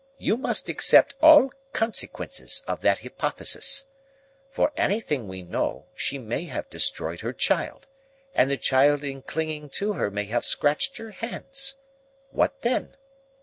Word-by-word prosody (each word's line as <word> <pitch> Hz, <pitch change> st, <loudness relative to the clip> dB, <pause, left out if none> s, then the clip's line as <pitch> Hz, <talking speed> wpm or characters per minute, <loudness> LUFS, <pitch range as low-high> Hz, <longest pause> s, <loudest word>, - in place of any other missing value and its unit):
You -, -, 0 dB
must 255 Hz, -, 0 dB
accept -, -, +5 dB
all 300 Hz, -4 st, +8 dB, 0.2 s
consequences 225 Hz, 0 st, -1 dB
of -, -, -3 dB
that -, -, +2 dB
hypothesis. 275 Hz, 0 st, 0 dB, 0.6 s
For 285 Hz, -, +1 dB
anything 150 Hz, -, -1 dB
we 95 Hz, -1 st, -7 dB
know, 90 Hz, -, -3 dB
she 140 Hz, -, -2 dB
may 125 Hz, +6 st, -4 dB
have -, -, -5 dB
destroyed -, -, -1 dB
her -, -, -4 dB
child, -, -, -1 dB, 0.5 s
and 130 Hz, -, +3 dB
the 140 Hz, -, 0 dB
child 140 Hz, +3 st, +3 dB
in 135 Hz, -1 st, -5 dB
clinging 155 Hz, 0 st, -4 dB
to 210 Hz, +1 st, -1 dB
her 140 Hz, -, -1 dB
may 105 Hz, +1 st, -3 dB
have 120 Hz, +4 st, -1 dB
scratched 150 Hz, -, +1 dB
her 225 Hz, -1 st, -9 dB
hands. 270 Hz, +5 st, -4 dB, 0.5 s
What 275 Hz, -, 0 dB
then? 240 Hz, +2 st, -1 dB
155 Hz, 145 wpm, -25 LUFS, -, 0.6 s, all